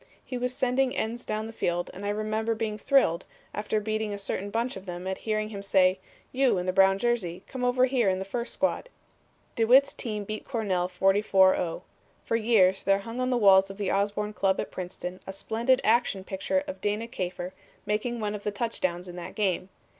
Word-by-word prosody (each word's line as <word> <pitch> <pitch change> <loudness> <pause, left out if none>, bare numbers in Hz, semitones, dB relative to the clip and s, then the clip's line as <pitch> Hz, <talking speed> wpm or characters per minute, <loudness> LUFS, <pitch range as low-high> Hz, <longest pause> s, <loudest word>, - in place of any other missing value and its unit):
He 255 - -6
was 250 0 -1
sending 255 0 +1
ends 235 +2 -2
down 215 0 -2
the 225 - -8
field 175 -4 -1
and 195 - -9
I 205 - -1
remember 215 +2 -1
being 215 -1 -3
thrilled, 205 -10 +3 0.3
after 210 +1 -1
beating 215 0 -2
a - - -6
certain 200 0 -3
bunch 230 +4 -1
of 190 0 -10
them, 175 0 -6
at 190 0 -3
hearing 215 0 0
him 200 -2 -6
say: 190 -1 +3 0.3
'You 260 -5 +3
in 180 - -2
the 185 - 0
brown 195 0 +5
jersey, 195 -6 -1
come 260 -1 -6
over 250 +1 +4
here 250 -5 +2
in 185 - +1
the 190 - -4
first 235 +5 -3
squad.' 285 - -1 0.7
"DeWitt's 255 +5 +5
team 210 -4 -4
beat 215 +1 -5
Cornell 195 -8 -1
44 190 +1 +4
0. 165 -2 -3 0.4
For - - 0
years 210 -5 +4
there 195 0 +3
hung 230 +5 -6
on 255 - 0
the 250 - +2
walls 195 -3 +6
of 195 - -8
the 205 -2 -1
Osborn 205 +1 0
Club 195 -2 +1
at - - -3
Princeton 180 0 -6
a - - -3
splendid 235 +6 +1
action 220 -4 +2
picture 195 +10 -1
of 285 - -6
Dana 210 +2 -1
Kafer 180 -5 -4 0.3
making 230 +3 -1
one 210 -1 -2
of 210 - -5
the 210 - -1
touchdowns 185 -5 -2
in 175 - -8
that 175 - -7
game. 190 -3 0
210 Hz, 205 wpm, -27 LUFS, 190-235 Hz, 0.7 s, walls